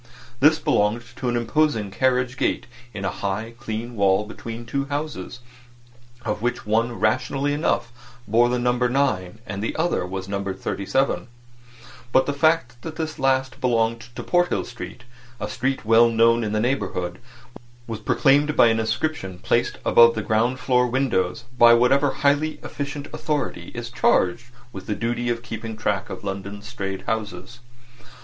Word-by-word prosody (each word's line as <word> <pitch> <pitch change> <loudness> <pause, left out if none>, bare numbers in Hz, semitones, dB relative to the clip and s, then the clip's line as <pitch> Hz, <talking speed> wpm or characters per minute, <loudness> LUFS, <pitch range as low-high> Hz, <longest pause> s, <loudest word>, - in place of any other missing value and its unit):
This 155 +3 +6
belonged 105 -4 +1
to 125 - -2
an 120 - 0
imposing 120 -3 +1
carriage 125 +3 +1
gate - - 0 0.3
in 100 -4 -5
a - - 0
high, 105 +4 -3
clean 115 +2 -5
wall 100 0 +3
between 115 +2 -8
two 140 +4 -2
houses, 140 -6 -5 0.8
of 105 - -2
which 120 +1 -2
one 115 +3 +1
rationally 130 +6 +1
enough 120 -6 0 0.4
bore 120 +3 +4
the 125 - +1
number 125 0 +1
9 115 -8 0
and 100 -5 -5
the 110 - -2
other 165 - 0
was 95 +1 -5
numbered 100 -1 -3
37; 125 +11 -1 0.8
but 130 - +4
the 145 - -1
fact 140 -5 +1
that 160 -1 -7
this 160 -1 -4
last 130 0 +1
belonged 115 -2 +1
to - - -5
Porthill 175 0 +1
Street, 120 +1 -9 0.4
a 105 - -3
street 130 +3 -2
well 115 +1 +6
known 115 +1 +4
in 105 - -2
the 110 - 0
neighbourhood, 95 -8 -1 0.7
was 115 -2 -5
proclaimed 145 +2 +3
by 115 - +7
an 115 0 +1
inscription 110 - -2
placed - - 0
above 115 0 +6
the 110 - -2
ground 115 +5 +1
floor 125 -1 +2
windows 120 -6 0 0.2
by 120 0 +8
whatever 135 +4 +4
highly 145 +3 +1
efficient 145 0 -5
authority 145 - -3
is 120 0 -5
charged 120 -2 +2 0.3
with 95 -1 -8
the 105 - -1
duty 120 +2 -2
of 120 0 -2
keeping 110 -1 -6
track 105 -3 -1
of - - -7
London's 100 +1 -5
strayed 95 -5 -5
houses. 110 +2 -4
120 Hz, 160 wpm, -23 LUFS, 105-130 Hz, 0.8 s, by